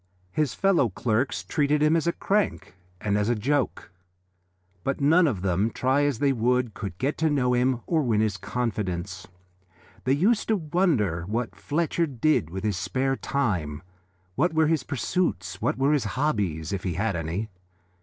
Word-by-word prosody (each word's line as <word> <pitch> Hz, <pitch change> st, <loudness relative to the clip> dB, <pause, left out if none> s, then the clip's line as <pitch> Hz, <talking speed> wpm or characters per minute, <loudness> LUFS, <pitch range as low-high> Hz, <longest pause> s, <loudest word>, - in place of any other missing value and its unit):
His 150 Hz, -1 st, 0 dB
fellow 190 Hz, -, +3 dB
clerks 115 Hz, +6 st, -1 dB
treated 150 Hz, 0 st, +1 dB
him 155 Hz, +2 st, +4 dB
as 165 Hz, 0 st, +1 dB
a -, -, +4 dB
crank 195 Hz, -, -1 dB, 0.3 s
and 105 Hz, +2 st, 0 dB
as 105 Hz, +2 st, 0 dB
a 120 Hz, -, +2 dB
joke, 135 Hz, +2 st, -1 dB, 0.9 s
but 135 Hz, -, -1 dB
none 160 Hz, +5 st, +5 dB
of 100 Hz, -10 st, -2 dB
them, 95 Hz, +3 st, +1 dB
try 135 Hz, +4 st, +1 dB
as 145 Hz, -5 st, 0 dB
they 140 Hz, +2 st, +2 dB
would, 125 Hz, -1 st, +1 dB
could 100 Hz, -5 st, -6 dB
get 140 Hz, +7 st, -1 dB
to 160 Hz, 0 st, +2 dB
know 130 Hz, -4 st, +2 dB
him 125 Hz, 0 st, +1 dB
or 165 Hz, -2 st, +1 dB
win 115 Hz, -6 st, +1 dB
his 110 Hz, -2 st, +1 dB
confidence. 95 Hz, -6 st, -3 dB, 0.8 s
They 130 Hz, -, +3 dB
used 200 Hz, +10 st, +2 dB
to 220 Hz, -, +3 dB
wonder 150 Hz, -, +1 dB
what 115 Hz, +3 st, -2 dB
Fletcher 165 Hz, +2 st, 0 dB
did 135 Hz, -, +1 dB
with 95 Hz, +4 st, -6 dB
his 105 Hz, -4 st, 0 dB
spare 135 Hz, +7 st, 0 dB
time, 95 Hz, -, -2 dB, 0.5 s
what 160 Hz, -, +1 dB
were 160 Hz, 0 st, +4 dB
his 155 Hz, -2 st, +2 dB
pursuits, 125 Hz, -, -2 dB
what -, -, 0 dB
were 135 Hz, +3 st, +3 dB
his 145 Hz, -, +1 dB
hobbies, 100 Hz, -, -1 dB
if 95 Hz, -, -2 dB
he 90 Hz, -2 st, -2 dB
had 100 Hz, +1 st, 0 dB
any. 85 Hz, +7 st, -3 dB
125 Hz, 175 wpm, -26 LUFS, 100-150 Hz, 0.9 s, none